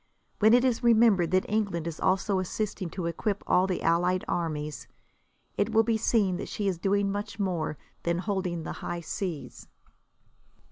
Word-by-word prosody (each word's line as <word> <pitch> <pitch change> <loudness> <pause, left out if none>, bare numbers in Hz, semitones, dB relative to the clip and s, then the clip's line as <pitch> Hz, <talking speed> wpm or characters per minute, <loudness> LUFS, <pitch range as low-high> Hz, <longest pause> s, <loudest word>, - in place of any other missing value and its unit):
When 220 +2 +6
it 250 +1 +4
is 250 -3 +1
remembered 225 -7 +4
that 185 +1 +2
England 200 -6 -1
is 170 -2 -5
also 195 +1 +1
assisting 190 0 -3
to 180 +1 -5
equip 195 +5 -2
all 185 +1 +3
the 185 - -2
allied 175 +2 +2
armies, 155 -3 -3 0.7
it 220 +2 +1
will 225 0 +5
be 230 0 +1
seen 210 -4 +2
that - - -6
she 205 - -2
is 185 -4 -1
doing 200 +1 +1
much 205 0 -4
more 175 -7 -2 0.2
than 170 0 0
holding 185 -3 -2
the - - -5
high 175 0 -4
seas. 170 -1 -5
190 Hz, 170 wpm, -28 LUFS, 170-210 Hz, 0.7 s, When